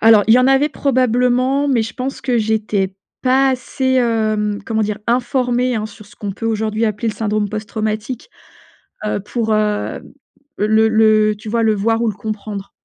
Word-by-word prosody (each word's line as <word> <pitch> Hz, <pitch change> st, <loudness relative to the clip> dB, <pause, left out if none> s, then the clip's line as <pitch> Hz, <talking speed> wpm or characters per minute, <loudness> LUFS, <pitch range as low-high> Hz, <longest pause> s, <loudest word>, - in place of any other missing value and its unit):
Alors 220 Hz, -2 st, +6 dB
il 220 Hz, -, +6 dB
y -, -, +6 dB
en 255 Hz, -, +4 dB
avait 270 Hz, +2 st, +4 dB
probablement, 255 Hz, 0 st, +1 dB
mais 250 Hz, -5 st, +2 dB
je 225 Hz, -, -6 dB
pense 265 Hz, +1 st, -4 dB
que 250 Hz, -3 st, 0 dB
j'étais 210 Hz, -3 st, 0 dB, 0.3 s
pas 265 Hz, +1 st, +3 dB
assez, 260 Hz, +1 st, -1 dB
hem, 215 Hz, -4 st, +1 dB
comment 220 Hz, 0 st, 0 dB
dire? 210 Hz, 0 st, -2 dB
Informée, 245 Hz, 0 st, +1 dB
hein, 215 Hz, 0 st, -2 dB
sur 210 Hz, -1 st, -14 dB
ce -, -, -19 dB
qu'on 205 Hz, -2 st, -4 dB
peut 225 Hz, +4 st, -5 dB
aujourd'hui 220 Hz, 0 st, 0 dB
appeler 215 Hz, +1 st, -1 dB
le 215 Hz, -, -3 dB
syndrome 210 Hz, -1 st, -1 dB
post-traumatique, 215 Hz, +2 st, -4 dB, 0.8 s
heu, 210 Hz, -, -1 dB
pour, 220 Hz, +2 st, -2 dB
heu, 210 Hz, -1 st, -1 dB, 0.6 s
le 220 Hz, +1 st, +3 dB
le, 215 Hz, -1 st, +4 dB
heu, 210 Hz, -, -3 dB
tu 210 Hz, +1 st, -9 dB
vois? 230 Hz, +1 st, +1 dB
Le 220 Hz, -1 st, +3 dB
voir 225 Hz, +3 st, +1 dB
ou 235 Hz, -, +1 dB
le 210 Hz, -, -5 dB
comprendre. 205 Hz, -2 st, -6 dB
220 Hz, 185 wpm, -18 LUFS, 215-245 Hz, 0.8 s, Alors